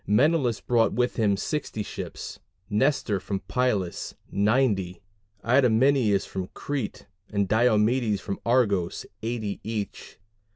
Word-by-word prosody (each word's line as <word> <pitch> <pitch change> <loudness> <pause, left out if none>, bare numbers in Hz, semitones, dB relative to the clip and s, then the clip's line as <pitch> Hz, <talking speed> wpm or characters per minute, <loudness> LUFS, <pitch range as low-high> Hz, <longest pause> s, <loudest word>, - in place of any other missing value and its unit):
Menelaus 125 - +3
brought 115 -2 +2
with 125 0 0
him 105 -4 +2
60 110 -4 -3
ships, - - -7 0.3
Nestor 110 -3 +1
from 95 +1 -4
Pylus, 105 -9 -1 0.2
90, 100 -4 +1 0.5
Idomeneus 125 -3 +4
from 95 -1 -5
Crete 140 -7 -4 0.3
and 100 -1 +1
Diomedes 110 0 +3
from 100 - -5
Argos, 105 -8 +1 0.2
80 110 -3 -3
each. 110 -2 -5
110 Hz, 110 wpm, -26 LUFS, 100-125 Hz, 0.5 s, Idomeneus